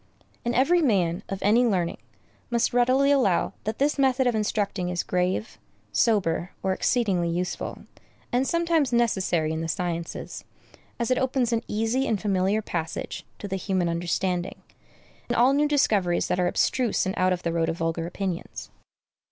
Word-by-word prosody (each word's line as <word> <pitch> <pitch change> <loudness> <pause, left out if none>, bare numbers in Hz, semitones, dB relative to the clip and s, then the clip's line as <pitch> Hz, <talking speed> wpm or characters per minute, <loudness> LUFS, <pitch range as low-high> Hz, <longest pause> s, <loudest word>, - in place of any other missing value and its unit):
And 240 0 -1
every 335 +8 +4
man, 190 - +1
of 195 - -3
any 220 +5 +4
learning, 185 -8 0 0.5
must 235 -1 +1
readily 255 +3 +3
allow 250 -11 +2
that 215 - -2
this 285 +1 +1
method 265 -1 +3
of 245 - +2
instructing 205 -4 -1
is 180 -1 -1
grave, 180 - -1 0.3
sober, 175 - +1
or 190 0 +1
exceedingly 190 -6 +1
useful, 175 +2 -3 0.5
and 255 +2 +1
sometimes 335 -5 +1
necessary 190 -9 +1
in 160 - -3
the 165 - -3
sciences, 170 +1 -4 0.5
as 235 0 -1
it 255 - +3
opens 255 -2 0
an 225 - +1
easy 225 +5 0
and 215 - 0
familiar 200 +1 +1
passage 165 -4 -4
to 205 - -6
the 195 0 -2
human 185 -2 0
understanding, 175 +1 -2 0.7
in - - 0
all 250 +3 +5
new 295 +1 +3
discoveries 205 -12 +2
that 180 - 0
are 180 - +2
abstruse 240 +4 +1
and 190 - -1
out 185 0 +2
of 180 -1 -2
the 170 - -1
road 165 -1 +1
of 165 - -3
vulgar 165 0 -2
opinions. 185 -1 -5
200 Hz, 165 wpm, -25 LUFS, 175-245 Hz, 0.7 s, all